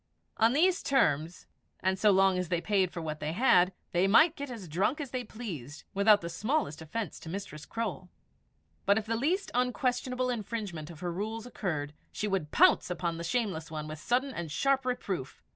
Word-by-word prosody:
On 225 +2 +4
these 355 +5 +3
terms, 165 - +1 0.3
and 190 0 0
so 210 - +5
long 190 -1 +4
as 180 -2 -3
they 175 - +1
paid 190 0 +1
for 175 -2 -6
what 155 -1 -4
they 150 +1 -3
had, 180 -4 +5 0.2
they 180 +2 +3
might 310 - +6
get 285 -1 -5
as 225 -7 -7
drunk 190 - 0
as 280 -4 -5
they 255 -1 -2
pleased, 165 - -7
without 205 +1 +5
the 170 - -4
smallest 215 - -1
offence 205 +8 -4
to 160 - -9
Mistress 170 -5 -6
Croale. 205 -5 -4 0.8
But 200 +1 +5
if 220 - -1
the 230 +1 -1
least 330 - 0
unquestionable 250 0 0
infringement 205 -8 -4
of 160 -3 -11
her 175 -1 -2
rules 220 +5 -4
occurred, 155 -11 -3 0.2
she 210 - -2
would 195 -7 -1
pounce - - +5
upon 170 -1 -2
the 170 - -5
shameless 180 -5 -1
one 155 -1 -5
with 155 0 -7
sudden 255 - 0
and 170 -3 -5
sharp 270 - +1
reproof. 190 - -3
195 Hz, 195 wpm, -30 LUFS, 170-245 Hz, 0.8 s, might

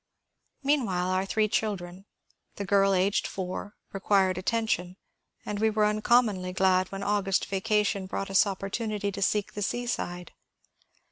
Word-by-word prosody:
Meanwhile 205 -11 +1
our 185 +1 0
three 215 +1 +2
children, 195 -3 -3 0.5
the 200 - -4
girl 195 0 +3
aged 190 +2 +1
four, 190 +2 -5 0.2
required 195 -1 +2
attention, 185 -2 -1 0.5
and 205 -1 -3
we 220 +1 +3
were 215 -1 +2
uncommonly 210 -3 +2
glad 185 0 +2
when 195 0 -5
August 200 -2 +1
vacation 200 -1 0
brought 195 +1 -4
us 195 +2 +5
op 195 -2 -4
portunity 205 0 -2
to 200 - -5
seek 205 +1 0
the 205 - -5
seaside. 195 -6 -3
195 Hz, 140 wpm, -28 LUFS, 185-210 Hz, 0.5 s, us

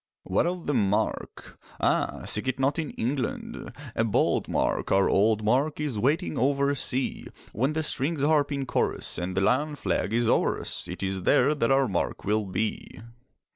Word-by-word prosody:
What 95 - +1
of 180 -1 -3
the 145 - 0
mark? 105 -4 -1 0.2
Ah, - - 0
seek 105 +5 -1
it 130 0 -1
not 140 +4 +1
in 155 - -2
England, 125 +2 -3 0.2
A 115 - +2
bold 115 - +1
mark, - - -1
our 95 0 +4
old 110 +2 +2
mark 135 +8 +1
Is 145 -8 -2
waiting 150 - 0
over 140 +2 +2
sea. 130 -1 -2 0.3
When 130 +7 0
the 160 0 -1
strings 145 0 -1
harp 150 -1 +3
in 140 -1 -2
chorus, - - -1
And 90 +1 -4
the - - +3
lion 145 +9 +1
flag 125 - -1
is 120 0 +1
o'er - - +2
us, - - -2
It - - -6
is 95 -1 -2
there 125 +10 +4
that 125 -6 0
our 135 0 +4
mark 95 -5 -2
will 105 +1 +1
be. 95 +4 -2
130 Hz, 180 wpm, -26 LUFS, 105-145 Hz, 0.3 s, our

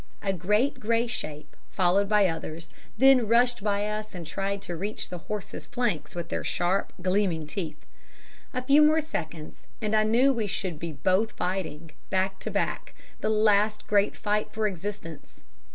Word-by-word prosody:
A 195 -1 +1
great 210 - +1
grey 230 0 +1
shape, 155 -10 -5
followed 195 +2 +2
by 210 -2 +5
others, 165 0 -5 0.3
then 260 -2 +6
rushed 240 0 +3
by 205 -1 +1
us 210 -1 -4
and 175 -2 -6
tried 195 +4 -2
to 175 - -5
reach 205 +6 -4
the 180 - -6
horses' 210 +3 -6
flanks 240 - -2
with 170 -1 -4
their - - -2
sharp, 180 +3 0
gleaming 185 -4 +1
teeth. 155 -1 -5 0.7
A 255 -1 -3
few 280 +3 +6
more 310 +1 +5
seconds, 165 - -6
and 215 -1 0
I 215 - +5
knew 240 +6 +4
we 225 -4 -1
should 180 -5 -3
be 170 0 -4
both 185 +9 +1
fighting, 165 -4 -3 0.2
back 190 0 0
to - - -4
back, - - -2 0.2
the - - 0
last 210 0 +3
great 205 0 +2
fight 210 0 -1
for 220 0 -1
existence. 190 -5 -6
200 Hz, 170 wpm, -27 LUFS, 175-220 Hz, 0.7 s, then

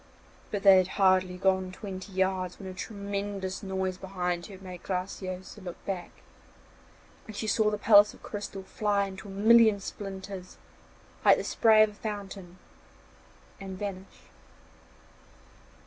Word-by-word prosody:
But 205 -2 -3
they 195 -1 +9
had 185 - +1
hardly 185 -2 +3
gone 190 0 +1
twenty 190 0 -8
yards 185 -1 -1
when 195 - -9
a 185 - -6
tremendous 200 -1 -4
noise 190 -2 -3
behind 180 -2 -3
her 195 - -10
made 185 -2 -9
Graciosa 185 +1 -5
look 180 -2 -9
back, 185 -3 -4 1.2
and 215 - -9
she 210 - -3
saw 215 0 +2
the 210 - -2
palace 205 0 +6
of - - -18
crystal 205 -2 -6
fly 205 0 0
into 195 +1 -9
a - - -8
million 220 +1 +5
splinters, 195 -2 -7 0.7
like - - +7
the - - -3
spray 220 -1 +5
of 215 - +2
a - - -15
fountain, 200 -4 -7 1.0
and 190 -1 -7
vanish. 195 -1 -7
195 Hz, 140 wpm, -29 LUFS, 185-205 Hz, 1.2 s, they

